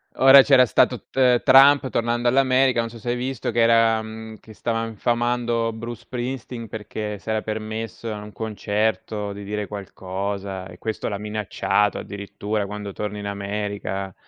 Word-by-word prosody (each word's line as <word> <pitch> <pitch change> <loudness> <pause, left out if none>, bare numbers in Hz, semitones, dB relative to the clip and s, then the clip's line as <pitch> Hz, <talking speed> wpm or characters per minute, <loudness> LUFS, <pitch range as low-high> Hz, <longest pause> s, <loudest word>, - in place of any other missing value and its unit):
Ora 135 +1 +9
c'era 130 -2 +6
stato 115 - +2
T - - -27
ehm, 125 -2 +4
Trump, 135 +1 +7
tornando 120 0 0
all'America. 130 0 +3
Non 115 0 -1
so 115 - -11
se 120 - -5
hai 120 - +1
visto, 125 -1 -3
che 115 - -1
era, 115 -1 +4
mhmm 110 0 -9
che 110 - -14
stava 115 +1 -2
infamando 120 +1 0
Bruce 115 +1 -7
Springsteen 125 -1 -5
perché 105 -1 -5
si - - -10
era 110 -1 0
permesso 110 0 -5
a 105 - -6
un 105 - -10
concerto 110 -1 -2
di 100 0 -8
dire 105 0 -4
qualcosa 95 -1 -5
e - - -13
questo 110 -1 -3
l'ha 100 -2 -3
minacciato 105 -1 0
addirittura: 100 +1 -4
"Quando 105 0 -6
torni 105 +1 -4
in 100 - -5
America 100 -1 -4
110 Hz, 170 wpm, -23 LUFS, 105-120 Hz, -, Ora